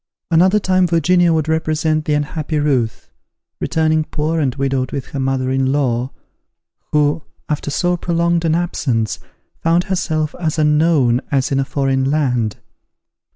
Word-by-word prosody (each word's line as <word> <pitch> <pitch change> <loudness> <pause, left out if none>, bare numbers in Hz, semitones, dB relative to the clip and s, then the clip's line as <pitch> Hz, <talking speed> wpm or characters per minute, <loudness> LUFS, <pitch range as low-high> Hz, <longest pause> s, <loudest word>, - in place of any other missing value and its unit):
Another 185 +5 +4
time 185 -2 +2
Virginia 175 +1 +3
would 155 -2 0
represent 155 -1 0
the 150 - +1
unhappy 150 +1 -2
Ruth, 135 -7 -1 0.5
returning 160 -1 +1
poor 155 +2 -2
and 135 -4 0
widowed 135 -2 -1
with 140 -2 -5
her 140 - -5
mother 130 -1 -1
in 135 0 +1
law, 130 -3 0 0.8
who, 150 +1 +2 0.3
after 150 -1 -2
so 175 +4 0
prolonged 170 0 0
an 160 -1 +2
absence, 130 -10 -1 0.4
found 170 +2 +2
herself 160 -5 -1
as 160 -2 -1
unknown 150 -5 +3
as 135 -1 0
in 135 - +1
a 135 - 0
foreign 135 -1 0
land. 125 -8 0
150 Hz, 145 wpm, -18 LUFS, 135-165 Hz, 0.8 s, Another